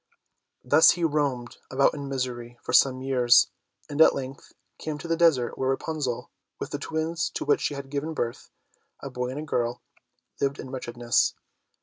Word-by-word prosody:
Thus 145 +5 +6
he 175 - -2
roamed 145 -6 -1
about 135 +1 +3
in 140 -2 -6
misery 120 -3 -4
for - - -4
some 130 -1 +4
years, 125 -3 +4 0.4
and 145 +2 -1
at - - +7
length 135 0 -7 0.3
came 155 -1 -4
to 160 - -8
the 165 - +1
desert 160 -8 +2
where 130 - +1
Rapunzel, 135 -2 -2 0.3
with - - -5
the - - -3
twins 160 +2 -2
to - - -3
which 145 - +3
she 145 - -1
had 140 -1 -8
given 150 +3 -3
birth, 120 -4 -3 0.5
a - - -6
boy 125 0 -3
and 130 - -5
a - - -4
girl, 120 -5 -2 0.6
lived 140 0 0
in 130 - -8
wretchedness. 120 -2 0
135 Hz, 180 wpm, -26 LUFS, 125-150 Hz, 0.6 s, at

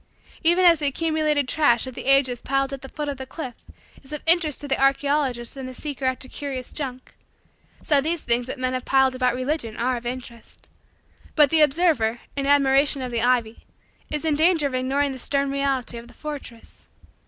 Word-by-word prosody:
Even 345 +3 +4
as 335 -3 +6
the 295 - +1
accumulated 305 -1 0
trash 255 -5 +2
of 260 - -7
the - - -8
ages 270 -3 +3
piled 275 0 -1
at 270 - -6
the 270 - -10
foot 295 0 -5
of 285 -2 -3
the 265 0 -8
cliff 260 -2 -7 0.5
is 270 - -15
of 300 - -6
interest 325 -3 +3
to 290 - -7
the 270 - -1
archaeologist 275 -3 +1
and 265 -1 -6
the 255 - -9
seeker 280 -2 -5
after 260 0 -2
curious 265 -2 -6
junk, 260 -4 -5 0.7
so 290 -2 +3
these 320 +2 -1
things 240 +1 +1
that - - -5
men 255 0 -2
have 255 -1 -3
piled 265 -1 +3
about 255 -1 0
Religion 255 -3 -3
are 250 +1 0
of 240 - -10
interest. 240 -2 -9 0.7
But 295 -3 +5
the 320 -1 +4
observer, 295 -7 +2 0.2
in 275 -1 -2
admiration 275 0 +3
of 250 - -5
the 235 -1 -1
ivy, 235 -2 0 0.4
is 300 +1 -3
in 315 - +2
danger 320 0 +3
of 275 - -2
ignoring 270 +2 0
the 260 - -7
stern 280 +2 0
reality 275 -4 -1
of 235 - -13
the - - -18
fortress. 285 -6 -9
275 Hz, 200 wpm, -23 LUFS, 255-295 Hz, 0.7 s, as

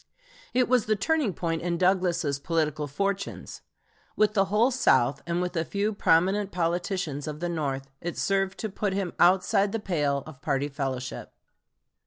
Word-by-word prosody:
It 250 -1 +3
was 250 -3 +2
the 215 - +3
turning 285 +2 +1
point 165 -2 -2
in 170 0 -1
Douglas's 175 -6 +1
political 155 -1 -1
fortunes. 195 +6 -3 0.5
With 215 -1 +3
the 195 -2 +3
whole 215 +6 +2
South, 135 - +3
and 170 +1 0
with 180 0 -4
a 165 - +1
few 205 +5 -1
prominent 195 +2 +2
politicians 170 -3 -2
of 150 0 -5
the 175 +1 -2
North, 140 -5 -2
it 175 0 -4
served 195 -1 0
to 220 - -2
put 200 0 -2
him 190 -3 -2
outside 190 +2 +4
the 225 - -2
pale 145 -8 0
of 145 -4 -12
party 140 -1 0
fellowship. 135 -3 -5
175 Hz, 165 wpm, -27 LUFS, 150-200 Hz, 0.5 s, outside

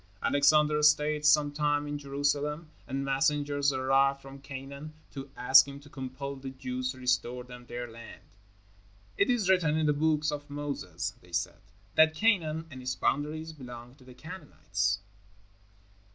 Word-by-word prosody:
Alexander 150 +1 +4
stayed 150 0 +3
some 150 -1 +5
time 145 0 0
in 145 - -3
Jerusalem, 145 +2 -1 0.2
and 135 0 -3
messengers 145 0 +1
arrived 135 +1 +2
from 135 0 -12
Canaan 140 +3 -8 0.2
to 135 -1 -8
ask 130 +2 +7
him 140 0 -8
to 145 0 -16
compel 135 +1 -6
the 135 0 -7
Jews 130 -1 -4
to - - -15
restore 125 -1 0
them 125 0 -12
their 120 0 -5
land. 115 0 -12 0.9
"It 200 - +2
is 240 -6 +2
written 170 -5 +3
in 160 - +1
the 150 - +3
Books 150 0 +1
of 145 0 -6
Moses," 140 - -4
they 90 - -19
said, 85 +5 -2 0.3
"that 160 0 +5
Canaan 165 -6 +1
and 130 -2 -8
its 125 0 -2
boundaries 155 +5 -1
belong 125 -4 -10
to 135 -1 -20
the 125 -1 -14
Canaanites." 120 - -3
140 Hz, 155 wpm, -29 LUFS, 130-150 Hz, 0.9 s, ask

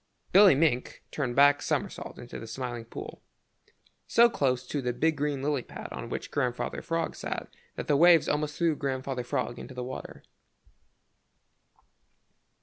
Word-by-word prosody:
Billy 195 -5 +8
Mink 140 -4 0
turned 130 -5 -2
a - - -10
back 145 +1 +6
somersault - - -3
into 120 - -8
the 115 - -8
Smiling 120 0 -5
Pool 115 - -8 0.9
so 235 0 +5
close 130 - 0
to 145 +3 -3
the 125 -1 -1
big 160 +5 +1
green 145 -1 -2
lily 145 -2 0
pad - - -9
on - - -6
which - - -5
Grandfather 125 -3 -2
Frog 165 -1 -2
sat - - -5 0.2
that - - -5
the 145 - +3
waves 170 +2 +6
almost 150 0 -1
threw 165 -3 +2
Grandfather 130 -2 -3
Frog 120 0 -2
into 130 - -9
the 125 - -4
water. 130 +1 -8
140 Hz, 155 wpm, -28 LUFS, 125-150 Hz, 0.9 s, Billy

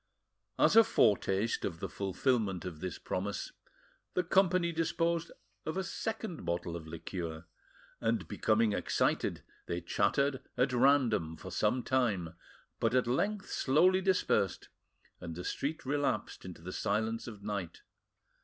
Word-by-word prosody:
As - - +4
a 225 - +10
foretaste 105 - +2
of 85 -4 -3
the - - -3
fulfilment 100 -2 0
of 85 -4 -6
this 90 0 -4
promise, 100 +2 -3 0.6
the 180 - +2
company 180 -1 +3
disposed 165 0 0 0.3
of 155 - -3
a 190 - 0
second 220 -2 -4
bottle 85 0 -2
of 80 -2 -7
liqueur, 85 0 -5 0.5
and, 115 -4 0
becoming 110 -1 +2
excited, - - 0 0.2
they 85 - -1
chattered 130 - +1 0.2
at 125 +1 +2
random 120 - +3
for 95 - -9
some 110 +7 +1
time, 105 -11 0 0.5
but 115 +2 +1
at 130 - +4
length 200 - -1
slowly 180 +8 +4
dispersed, 185 - +1 0.5
and 85 -2 -6
the 90 - -6
street 145 - -3
relapsed 140 -9 -1
into 90 -3 -9
the 90 +1 -6
silence 110 +2 -1
of 105 -4 -9
night. 100 -5 -4
115 Hz, 135 wpm, -32 LUFS, 90-145 Hz, 0.6 s, a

